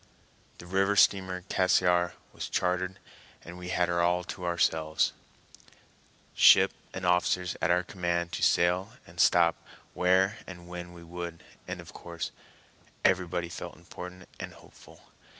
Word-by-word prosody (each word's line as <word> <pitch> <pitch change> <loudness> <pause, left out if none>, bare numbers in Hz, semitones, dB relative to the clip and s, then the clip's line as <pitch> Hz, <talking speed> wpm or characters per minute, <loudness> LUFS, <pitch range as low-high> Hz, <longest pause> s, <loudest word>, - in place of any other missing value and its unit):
The - - -12
river 95 +3 +1
steamer 95 -2 +3
Cassiar 90 -2 +2 0.2
was - - -6
chartered, 90 +1 -1 0.5
and 85 - -9
we 90 0 -7
had 90 0 +1
her 85 0 +1
all 90 +1 +2
to 90 0 -7
ourselves, 80 -2 +1 1.2
ship - - +7 0.2
and 95 -1 -5
officers 90 0 +1
at - - +1
our 90 +1 +3
command 85 -2 -2
to - - -4
sail 90 +5 +2
and 85 +1 -14
stop 85 -2 +4 0.3
where 95 +4 +2
and 85 -2 -10
when 90 0 -8
we 85 -1 -12
would, 85 0 -7 0.2
and - - -5
of - - -11
course 85 -1 -6 0.7
everybody 90 -2 +1
felt 85 - -7
important 90 +1 -10
and - - -6
hopeful. - - -17
90 Hz, 140 wpm, -29 LUFS, 85-90 Hz, 1.2 s, ship